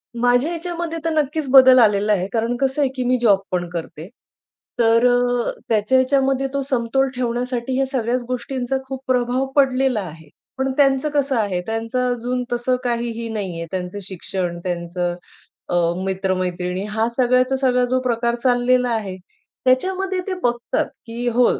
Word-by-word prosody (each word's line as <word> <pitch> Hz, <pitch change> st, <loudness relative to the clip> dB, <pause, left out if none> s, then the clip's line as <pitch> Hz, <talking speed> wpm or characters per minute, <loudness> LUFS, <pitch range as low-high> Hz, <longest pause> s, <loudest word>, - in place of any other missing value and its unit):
माझ्या 245 Hz, +4 st, +2 dB
ह्याच्यामध्ये 340 Hz, -1 st, -4 dB
तर -, -, +2 dB
नक्कीच 305 Hz, -1 st, -1 dB
बदल 260 Hz, -1 st, +8 dB
आलेला 210 Hz, -2 st, +4 dB
आहे, 185 Hz, -2 st, 0 dB
कारण 230 Hz, +1 st, 0 dB
कसं 270 Hz, +2 st, 0 dB
आहे 275 Hz, -, +2 dB
की 255 Hz, -, -2 dB
मी 250 Hz, +1 st, +2 dB
जॉब 205 Hz, -5 st, +5 dB
पण 175 Hz, -1 st, -1 dB
करते. 165 Hz, -1 st, -7 dB, 0.7 s
तर 230 Hz, +1 st, +4 dB
अ, 245 Hz, 0 st, +1 dB, 0.2 s
त्याच्या 220 Hz, +3 st, +2 dB
ह्याच्या 260 Hz, +2 st, +3 dB
मध्ये 270 Hz, 0 st, 0 dB
तो 280 Hz, -, 0 dB
समतोल 265 Hz, 0 st, 0 dB
ठेवण्यासाठी 245 Hz, +1 st, -2 dB
या 270 Hz, -, +2 dB
सगळ्याच 250 Hz, -2 st, -1 dB
गोष्टींचा 255 Hz, +1 st, -2 dB
खूप 265 Hz, 0 st, -5 dB
प्रभाव 250 Hz, +1 st, +1 dB
पडलेला 265 Hz, -4 st, +2 dB
आहे, 160 Hz, -3 st, -10 dB, 0.3 s
पण 265 Hz, 0 st, 0 dB
त्यांचं 275 Hz, 0 st, +3 dB
कसं 285 Hz, -2 st, 0 dB
आहे? 200 Hz, -5 st, 0 dB
त्यांचं 225 Hz, +2 st, -2 dB
अजून 245 Hz, +1 st, -2 dB
तसं 240 Hz, +1 st, +1 dB
काहीही 235 Hz, -1 st, -2 dB
नाही 200 Hz, -6 st, -4 dB
आहे. 165 Hz, -, -4 dB
त्यांचं 185 Hz, +1 st, -4 dB
शिक्षण, 180 Hz, -2 st, -4 dB
त्यांचं 175 Hz, 0 st, -2 dB, 0.5 s
अ, -, -, 0 dB, 0.3 s
मित्र-मैत्रिणी 185 Hz, -1 st, -2 dB
हा 220 Hz, +2 st, 0 dB
सगळ्याचा 255 Hz, +1 st, +3 dB
सगळा 250 Hz, -2 st, +2 dB
जो 255 Hz, +1 st, 0 dB
प्रकार 235 Hz, -1 st, 0 dB
चाललेला 245 Hz, 0 st, +2 dB
आहे, 215 Hz, -5 st, -2 dB, 0.5 s
त्याच्यामध्ये 375 Hz, +9 st, +1 dB
ते 385 Hz, -, -1 dB
बघतात, 240 Hz, 0 st, 0 dB, 0.2 s
की 235 Hz, +1 st, -4 dB
हो 245 Hz, +1 st, +4 dB
245 Hz, 160 wpm, -21 LUFS, 215-265 Hz, 0.7 s, बदल